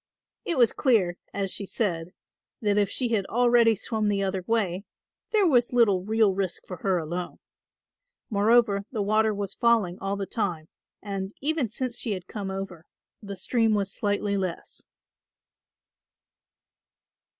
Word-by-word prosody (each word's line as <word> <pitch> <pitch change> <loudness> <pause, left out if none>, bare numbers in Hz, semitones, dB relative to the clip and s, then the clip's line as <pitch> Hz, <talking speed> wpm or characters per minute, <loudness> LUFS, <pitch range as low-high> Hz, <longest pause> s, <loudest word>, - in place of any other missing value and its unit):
It 335 - -1
was 240 -3 +5
clear, 200 -10 +2
as 195 -1 -2
she 200 - -3
said, 180 -5 -2 0.4
that 205 -2 +1
if 200 -2 +2
she 250 -3 -1
had 210 -4 0
already 235 -1 +4
swum 215 +1 -2
the 200 -1 0
other 190 -1 -2
way, 200 -5 0 0.5
there 425 -3 +3
was 250 -7 +3
little 215 -6 +4
real 215 -1 +3
risk 190 -2 -3
for 180 - -7
her 190 +1 +1
alone. 175 +2 -4 0.9
Moreover 210 -1 +3
the 220 -5 -1
water 215 +2 +2
was 200 -2 -4
falling 225 -7 +2
all 195 +1 -2
the 200 -1 -3
time 180 -8 -3 0.3
and, 195 -1 -4
even 290 -4 0
since 240 +2 -4
she 220 - -2
had 185 -2 -6
come 200 -3 -5
over, 190 -4 -6 0.3
the 200 -2 -7
stream 225 +3 +1
was 200 -1 -1
slightly 205 -1 -1
less. 185 -3 -4
205 Hz, 150 wpm, -26 LUFS, 190-230 Hz, 0.9 s, was